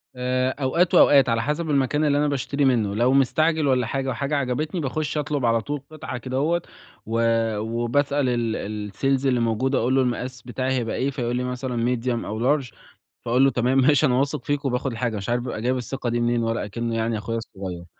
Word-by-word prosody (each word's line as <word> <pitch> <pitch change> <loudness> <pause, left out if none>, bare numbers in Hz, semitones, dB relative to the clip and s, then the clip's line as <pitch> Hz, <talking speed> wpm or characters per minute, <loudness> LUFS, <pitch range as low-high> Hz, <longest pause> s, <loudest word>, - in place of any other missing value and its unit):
آآ، 130 +1 0
أوقات 170 +7 +2
وأوقات 135 -4 +6
على 115 -1 +1
حسب 150 +6 -2
المكان 145 +1 +1
اللي 145 -1 +2
أنا 150 - +2
باشتري 140 0 -1
منه، 110 -6 +2
لو 120 +4 +3
مستعجل 155 +3 +2
والّا 125 -3 +2
حاجة 135 0 -2
وحاجة 140 +4 -2
عجبتني، 145 +5 -1
باخش 150 +2 -2
أطلب 145 -3 -1
على 115 0 +2
طول 145 +4 -4
قطعة 155 -4 -6
كده 130 +2 -4
هوّة، 170 +5 +1 0.4
و 115 +1 -1 0.4
وبسأل 125 +5 0
ال 110 -3 -2
الsales 135 +5 0
اللي 125 -2 +2
موجود، 120 +4 0
أقول 130 +3 +1
له 135 - +4
المقاس 125 0 -3
بتاعي 130 +2 -3
هيبقى 120 -3 -1
إيه؟ 135 +2 0
فيقول 120 -3 -2
لي 125 - -1
مثلًا 125 -1 -1
medium 120 0 -2
أو 110 +1 -4 0.2
large، 125 -4 -10 0.5
فأقول 125 +3 +3
له 135 - +4
تمام 125 +2 +1
ماشي 145 +2 +4
أنا 125 -3 +2
واثق 140 -1 -1
فيك، 145 0 -1
وباخد 130 +1 -1
الحاجة، 115 -2 -2
مش 100 +3 -5
عارف 120 0 +1
بابقى 120 -4 -4
جايب 125 +2 0
الثقة 125 0 -4
دي 120 - 0
منين، 120 0 +1
ولا 115 -1 -1
أكنّه 115 +2 -3
يعني 115 0 0
أخويا 115 +2 -3
الصغيّر. 95 -6 -7
125 Hz, 205 wpm, -23 LUFS, 115-140 Hz, 0.5 s, وأوقات